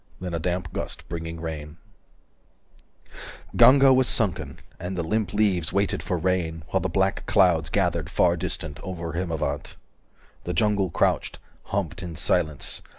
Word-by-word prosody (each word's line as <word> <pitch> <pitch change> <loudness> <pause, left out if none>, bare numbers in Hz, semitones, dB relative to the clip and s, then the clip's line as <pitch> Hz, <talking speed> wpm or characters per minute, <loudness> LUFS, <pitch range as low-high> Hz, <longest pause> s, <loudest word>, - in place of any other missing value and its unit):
Then 90 -1 -5
a 85 - -1
damp 90 -1 -2
gust - - -5
Bringing 80 0 -5
rain 80 -1 -6 1.8
Ganga 135 0 +7
was 130 -1 +4
sunken, 105 -7 -1 0.2
and 90 +2 -4
the 85 - 0
limp 105 +2 -1
leaves 100 -6 +1
395 - - -11
Waited 100 0 +1
for 90 - -2
rain, 85 -2 -1
while 95 - +1
the 95 - -1
black 95 +2 +1
clouds 85 -6 +4
Gathered - - 0
far - - +3
distant, 75 -1 -5
over 85 -3 -5
Himavant. 85 -3 -3 0.7
The - - -3
jungle 100 0 +2
crouched, - - 0 0.3
humped 95 -3 -3
in 85 -3 -6
silence. 75 -1 -1
90 Hz, 150 wpm, -25 LUFS, 80-95 Hz, 1.8 s, Ganga